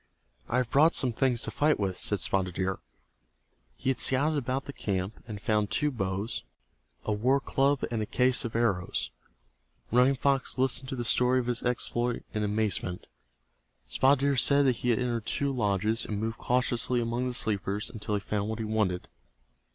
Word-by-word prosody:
"I 120 - +1
have 125 -2 0
brought 155 +4 +5
some 125 -3 +2
things 125 0 +1
to 110 - -3
fight 150 +1 +2
with," 95 -2 -1
said 105 +2 0
Spotted 90 -1 -1
Deer. 95 0 -1 1.0
He 130 - 0
had 130 - -3
scouted 145 +3 +3
about 130 +1 -2
the 140 - -8
camp, 95 -2 -3
and 105 -3 -6
found 105 0 0
two 150 0 +1
bows, 100 -1 -3 0.6
a - - -1
war 125 +7 +2
club 140 +1 +1
and 115 -2 -1
a 105 - -3
case 130 0 +2
of 115 -2 -5
arrows. 90 - 0 0.8
Running 125 +4 +4
Fox 135 0 0
listened 130 0 +1
to - - -3
the 120 -2 -4
story 125 +3 +3
of 125 - -2
his 120 -1 -1
exploit 120 0 -1
in 105 - -1
amazement. 105 -4 -1 0.8
Spotted 135 0 +3
Deer 140 -1 +2
said 140 +2 +5
that 125 -3 +2
he 125 - -2
had 115 - +3
entered 120 -3 -2
two 140 0 0
lodges, 105 -1 0
and 105 -2 -3
moved 115 +2 -3
cautiously 125 0 +1
among 120 +2 -1
the 125 - -2
sleepers 100 -1 -1
until 105 -1 -3
he 100 - -1
found 105 +1 -2
what 110 - -3
he 110 - -3
wanted. 105 -5 -1
120 Hz, 185 wpm, -28 LUFS, 105-130 Hz, 1.0 s, brought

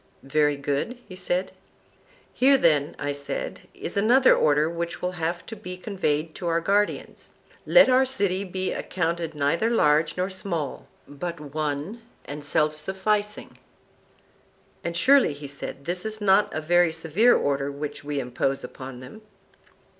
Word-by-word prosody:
Very 145 +2 +2
good, 145 - -2
he 185 - -10
said. 185 0 -2 0.8
Here 275 +2 +5
then, 150 - +2
I 145 0 -2
said, 140 -1 -4
is - - -4
another 240 +6 +5
order 150 +1 +3
which 170 +1 -4
will 180 - -2
have 170 0 -3
to 225 - -7
be 180 -3 -8
conveyed 165 -5 -2
to 175 - -4
our 165 0 +2
guardians: 205 +4 -1 0.3
Let - - +7
our 260 +1 +4
city 200 -7 0
be 185 0 -3
accounted 170 -2 -2
neither 150 +10 +1
large 155 -9 +2
nor 185 +2 -1
small, 170 -7 -4 0.2
but 170 +4 -6
one 150 +7 -4 0.2
and 145 +1 -7
self 150 +1 0
sufficing. 205 +5 -2 1.2
And 170 0 -3
surely, 260 - +4
said 140 0 -4
he, 140 - -22
this 175 +4 -1
is 220 0 -3
not 205 0 +3
a 155 - -3
very 175 +1 +3
severe 165 +9 +3
order 140 0 0
which 145 +1 -6
we 145 -1 -3
impose 135 +1 -2
upon 130 -1 -9
them. 130 +12 -11
170 Hz, 150 wpm, -25 LUFS, 145-195 Hz, 1.2 s, Let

